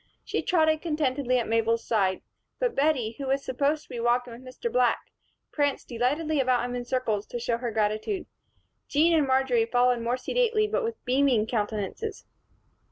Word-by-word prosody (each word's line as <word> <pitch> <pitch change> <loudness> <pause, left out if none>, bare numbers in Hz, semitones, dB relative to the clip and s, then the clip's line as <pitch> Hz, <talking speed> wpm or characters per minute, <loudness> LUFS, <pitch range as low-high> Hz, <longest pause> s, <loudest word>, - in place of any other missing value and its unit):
She - - -1
trotted 315 -3 +2
contentedly 285 -5 0
at 240 - -1
Mabel's 230 0 +1
side; 195 -4 +1 0.3
but - - 0
Bettie, 275 -6 +1
who 275 - -4
was 275 +1 0
supposed 285 +4 0
to - - -25
be 240 - -5
walking 240 +1 +1
with 235 - -11
Mr. 260 - -5
Black, - - +3 0.5
pranced 285 -2 -1
delightedly 285 +6 0
about 250 -2 +2
him 245 - -4
in 245 0 -4
circles, 235 -5 -1
to 240 - -5
show 235 0 -1
her 240 -1 -2
gratitude. 215 - -1 0.6
Jean 320 +4 +3
and 300 -3 +3
Marjory 260 -3 +2
followed 245 0 +2
more 240 +2 0
sedately 455 - +1
but 455 +3 -1
with 455 0 -5
beaming 255 -4 +3
countenances. 220 - -3
255 Hz, 170 wpm, -27 LUFS, 235-305 Hz, 0.6 s, Black